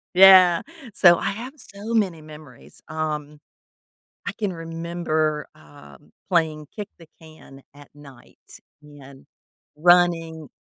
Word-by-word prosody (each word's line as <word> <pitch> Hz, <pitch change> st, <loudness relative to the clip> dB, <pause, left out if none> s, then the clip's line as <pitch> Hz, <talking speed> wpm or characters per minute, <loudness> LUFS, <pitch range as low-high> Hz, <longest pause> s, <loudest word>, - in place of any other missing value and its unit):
Yeah, 185 Hz, -2 st, +7 dB, 0.3 s
so, 175 Hz, -2 st, +6 dB
I -, -, -2 dB
have 240 Hz, +6 st, -7 dB
so 210 Hz, -3 st, -9 dB
many 195 Hz, -7 st, 0 dB
memories. 150 Hz, -5 st, -15 dB
Um, 150 Hz, -2 st, -5 dB, 0.9 s
I -, -, -1 dB
can 205 Hz, -4 st, -4 dB
remember, 165 Hz, -2 st, -3 dB
um, 75 Hz, -2 st, -18 dB, 0.2 s
playing 160 Hz, -4 st, -1 dB
kick 210 Hz, -2 st, -6 dB
the 165 Hz, -, -16 dB
can 155 Hz, -4 st, -16 dB
at 145 Hz, 0 st, -17 dB
night 140 Hz, -4 st, -17 dB, 0.5 s
and 140 Hz, -2 st, -16 dB, 0.5 s
running 165 Hz, -2 st, +2 dB
160 Hz, 115 wpm, -22 LUFS, 150-175 Hz, 0.9 s, Yeah